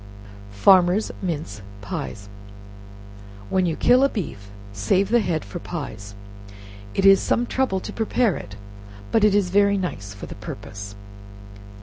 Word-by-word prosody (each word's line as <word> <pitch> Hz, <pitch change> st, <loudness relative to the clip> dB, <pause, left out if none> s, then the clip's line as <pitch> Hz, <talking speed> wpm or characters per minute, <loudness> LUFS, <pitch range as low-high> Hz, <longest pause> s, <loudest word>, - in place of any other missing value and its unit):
Farmers' 180 Hz, -, +4 dB
Mince 150 Hz, -, -4 dB, 0.2 s
Pies. 100 Hz, 0 st, -6 dB, 1.2 s
When 185 Hz, -1 st, +2 dB
you 165 Hz, -, -1 dB
kill 250 Hz, +9 st, +4 dB
a 275 Hz, -, +4 dB
beef, 125 Hz, -, -6 dB, 0.2 s
save 110 Hz, -, +1 dB
the 240 Hz, +1 st, +4 dB
head 170 Hz, -7 st, -1 dB
for 175 Hz, -, -7 dB
pies; 105 Hz, -, -7 dB, 0.8 s
it 195 Hz, -, +1 dB
is 195 Hz, 0 st, +7 dB
some 240 Hz, -, +1 dB
trouble 255 Hz, -7 st, 0 dB
to -, -, -7 dB
prepare 225 Hz, -2 st, +1 dB
it, 100 Hz, -, -8 dB, 0.6 s
but 220 Hz, -, +3 dB
it 210 Hz, -1 st, +5 dB
is 195 Hz, -3 st, +1 dB
very 200 Hz, 0 st, +4 dB
nice 100 Hz, -, -4 dB
for 100 Hz, 0 st, -9 dB
the -, -, -8 dB
purpose. 100 Hz, 0 st, -8 dB
180 Hz, 140 wpm, -23 LUFS, -, 1.2 s, is